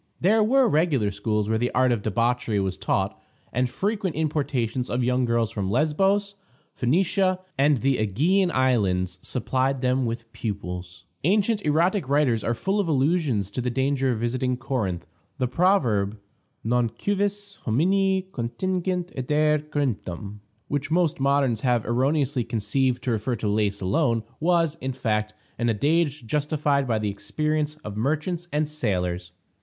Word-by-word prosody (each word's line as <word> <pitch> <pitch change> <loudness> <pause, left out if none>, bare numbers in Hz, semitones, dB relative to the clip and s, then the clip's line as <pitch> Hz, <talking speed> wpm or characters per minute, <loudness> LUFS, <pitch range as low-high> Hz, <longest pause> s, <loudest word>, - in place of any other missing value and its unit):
There 215 +5 +4
were 260 +3 +4
regular 150 - +2
schools 105 +1 -1
where 110 0 +1
the 120 +1 +1
art 130 0 +4
of 115 -4 0
debauchery 115 0 0
was 95 -1 -1
taught, - - -1 0.3
and 125 +1 +1
frequent 200 - -2
importations 135 -6 -1
of 125 +1 0
young 125 +1 +2
girls 115 -2 +1
from 100 -5 -2
Lesbos, 195 - +1 0.4
Phoenicia, 185 +7 +1 0.2
and 140 -2 +3
the 135 -1 +2
Ægean 160 - +2
Islands 95 - +1
supplied 130 +1 -1
them 130 -1 +1
with 115 0 -5
pupils. 90 -5 -5 0.2
Ancient 205 +5 +2
erotic 165 +1 +1
writers 140 -6 +2
are 115 - 0
full 195 - -1
of 200 - 0
allusions 140 - +1
to 125 - -3
the 125 - -1
danger 135 +1 +1
of 120 - -1
visiting 125 +2 -1
Corinth; 105 - -2 0.3
the 130 -2 0
proverb, 120 - +2 0.5
Non 120 +1 +1
cuivis 205 - -2
homini 190 - +2
contingit 180 +7 -2
adire 150 +3 +2
Corinthum, 105 - -3 0.3
which 145 0 -2
most 165 -3 +1
moderns 135 -4 +2
have 120 -3 +1
erroneously 135 +2 +1
conceived 120 +3 0
to 125 - 0
refer 115 +3 -1
to 110 -1 -3
Lais 105 -1 +1
alone, 115 - +1 0.2
was, 165 -2 +2
in 130 0 -2
fact, 105 -4 -1 0.2
an 120 0 +1
adage 145 +4 +1
justified 145 +1 0
by 115 -2 +1
the 105 -1 -1
experience 150 +8 -2
of 105 -1 -5
merchants 155 - -1
and 150 +1 0
sailors. 90 - -2
130 Hz, 150 wpm, -25 LUFS, 110-155 Hz, 0.5 s, There